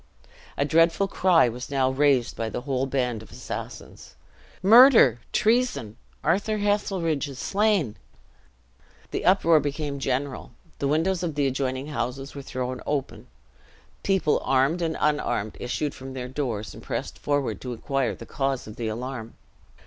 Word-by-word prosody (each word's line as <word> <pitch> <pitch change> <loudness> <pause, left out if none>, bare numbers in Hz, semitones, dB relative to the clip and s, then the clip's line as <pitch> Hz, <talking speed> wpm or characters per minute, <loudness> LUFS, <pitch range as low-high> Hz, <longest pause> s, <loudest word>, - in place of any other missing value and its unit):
A 140 - +2
dreadful 165 +5 +3
cry 180 -8 +4
was 125 +2 -6
now 135 -2 +1
raised 130 -3 +2
by 115 -1 -3
the - - -4
whole 135 0 -1
band 125 -4 -1
of 110 - -14
assassins: - - -8 0.5
"Murder! 220 - +8
treason! 215 - +1 0.3
Arthur 200 +7 +1
Heselrigge 195 -7 0
is 135 -2 -9
slain!" 200 - +1 1.1
The - - -3
uproar 170 -4 +5
became 145 -1 -3
general. 135 0 -3 0.3
The 140 - 0
windows 165 +5 +1
of 165 -4 -3
the 145 -1 +1
adjoining 130 0 -1
houses 135 +1 -4
were 140 - -7
thrown 130 -1 -4
open; 145 -2 -3 0.7
people 190 -6 +1
armed 135 +6 +2
and 165 -1 -1
unarmed 120 -8 0
issued 140 +4 -2
from 130 0 -9
their 125 -1 -5
doors 120 -6 -3
and - - -11
pressed - - -5
forward 145 -2 -1
to 125 -1 -5
inquire 135 +2 -1
the - - -10
cause 135 -2 -2
of 105 - -10
the 115 - -3
alarm. 115 0 -5
140 Hz, 150 wpm, -25 LUFS, 125-165 Hz, 1.1 s, Murder